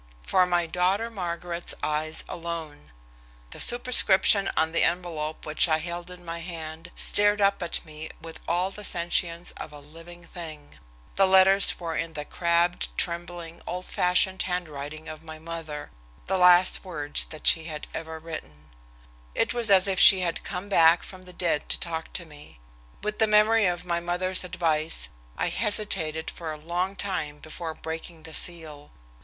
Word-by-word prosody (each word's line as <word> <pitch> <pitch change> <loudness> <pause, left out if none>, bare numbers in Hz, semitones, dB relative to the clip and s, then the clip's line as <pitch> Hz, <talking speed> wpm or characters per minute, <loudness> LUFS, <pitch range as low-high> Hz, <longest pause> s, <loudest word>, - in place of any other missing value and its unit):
"For 185 - +3
my 175 -1 +1
daughter 185 +7 0
Margaret's 175 -3 -3
eyes 155 +1 -1
alone." 165 - -6 0.6
The - - -8
superscription 215 -5 +4
on 160 0 +2
the 170 - +1
envelope 165 -3 -1
which 155 +2 +3
I 155 - +4
held 175 +2 -5
in 180 -1 -11
my 165 0 -5
hand 165 -1 -7
stared 205 0 +2
up 200 -1 +2
at 175 - -4
me 155 0 -8
with 165 0 -9
all 180 +3 0
the 210 +1 -9
sentience 170 -1 0
of - - -7
a 150 - -10
living 165 +4 -13
thing. 160 -4 -10 0.4
The 195 - +5
letters 190 +1 +5
were 165 -2 -4
in 165 0 -3
the 150 -1 -5
crabbed, 170 +1 +1
trembling, 170 -1 -4
old 180 +1 -4
fashioned 185 +1 +2
handwriting 155 -4 -4
of 155 0 -8
my 160 -1 -10
mother 160 -2 -7 0.3
the 190 0 0
last 180 0 +6
words 150 -6 0
that 155 -2 -11
she 165 -1 +4
had 155 -2 -6
ever 160 0 -5
written. 80 - -9 0.6
It - - +1
was 235 -2 +1
as 195 -1 +6
if 190 -2 0
she 190 -2 +9
had 170 -2 -2
come 195 +1 -5
back 165 -3 +5
from 185 -1 -10
the 180 - -11
dead 170 -4 -1
to - - -1
talk 165 -1 -4
to 170 - -3
me. 150 - -15 0.4
With 210 0 -3
the 220 - +4
memory 210 0 +5
of 175 0 -2
my 170 -1 0
mother's 180 +2 0
advice, 165 -3 0 0.3
I - - 0
hesitated 190 -7 0
for 165 -2 -6
a 155 - -6
long 175 +5 -2
time 165 -8 -3
before 160 +1 -6
breaking 160 +1 -7
the 160 -1 -10
seal. 155 -4 -1
170 Hz, 170 wpm, -26 LUFS, 160-185 Hz, 0.6 s, she